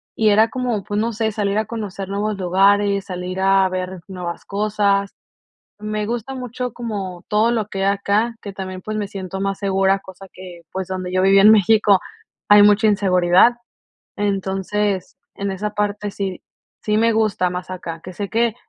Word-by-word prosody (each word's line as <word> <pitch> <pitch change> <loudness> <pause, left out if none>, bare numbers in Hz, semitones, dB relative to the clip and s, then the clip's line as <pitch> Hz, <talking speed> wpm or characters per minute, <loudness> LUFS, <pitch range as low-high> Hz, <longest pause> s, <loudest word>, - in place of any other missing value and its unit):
y 220 -1 +3
era 215 +2 +4
como, 245 -4 -2
pues, 205 +2 -2
no 230 +2 -1
sé, 220 0 -1
salir 205 -1 -1
a 215 - +1
conocer 200 -4 -6
nuevos 205 +1 -2
lugares, 200 +2 +2
salir 185 0 -5
a 195 0 +4
ver 185 -1 -4
nuevas 180 -3 -6
cosas. 200 -1 0 0.6
Me 210 0 -3
gusta 240 +3 -4
mucho 250 -1 -5
como 195 -7 -5
todo 215 +3 +3
lo 220 -4 -1
que 195 -2 -4
hay 200 - +3
acá, 205 +4 0
que 200 - -7
también, 185 -1 -6
pues, 215 +3 -5
me 205 -1 -2
siento 190 -1 -6
más 195 0 -1
segura, 195 0 +2
cosa 195 0 -13
que, 180 -2 -11
pues, 190 -1 -4
donde 185 -1 -4
yo 185 - +2
vivía 195 +1 +6
en 215 - +9
México, 210 -1 +5 0.5
hay 205 0 +8
mucha 210 +1 +5
inseguridad. 190 +1 +4 0.6
Entonces, 195 -1 -2 0.2
en 200 0 -3
esa 210 +2 -3
parte 210 0 -2
sí 195 -2 -4 0.4
sí 210 0 +1
me 230 +1 +3
gusta 215 -4 +1
más 180 +1 -6
acá, 170 -3 -6
que 185 - -9
sé 200 +2 -4
que 230 -1 +1
200 Hz, 180 wpm, -20 LUFS, 190-215 Hz, 0.6 s, en